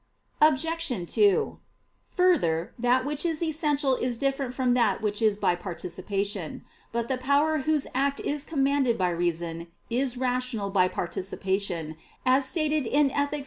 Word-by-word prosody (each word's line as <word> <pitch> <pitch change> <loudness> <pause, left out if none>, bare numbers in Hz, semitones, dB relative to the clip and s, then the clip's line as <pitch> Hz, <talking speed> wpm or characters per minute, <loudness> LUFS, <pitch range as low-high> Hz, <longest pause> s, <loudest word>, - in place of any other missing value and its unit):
Obj. 305 - +1
2: 205 -4 +3 0.5
Further, 220 - +1
that 250 +2 +2
which 295 0 -2
is 330 -1 -1
essential 295 -4 +1
is 245 -1 -2
different 275 0 -1
from 255 -1 +1
that 230 -6 +2
which 210 0 -2
is 215 -2 +3
by 195 - +2
participation. 185 +1 -4 0.3
But 235 0 -2
the 260 0 -1
power 285 +4 +2
whose 300 +1 +1
act 275 +2 0
is 290 -1 -2
commanded 275 -5 +1
by 180 -2 +1
reason, 170 -1 -2 0.2
is 250 +1 0
rational 250 -5 -1
by 185 -2 +4
participation, 185 -3 -3 0.3
as 260 +2 +4
stated 305 -2 0
in 285 +2 +3
_Ethic. 285 +2 -1
255 Hz, 145 wpm, -27 LUFS, 195-285 Hz, 0.5 s, by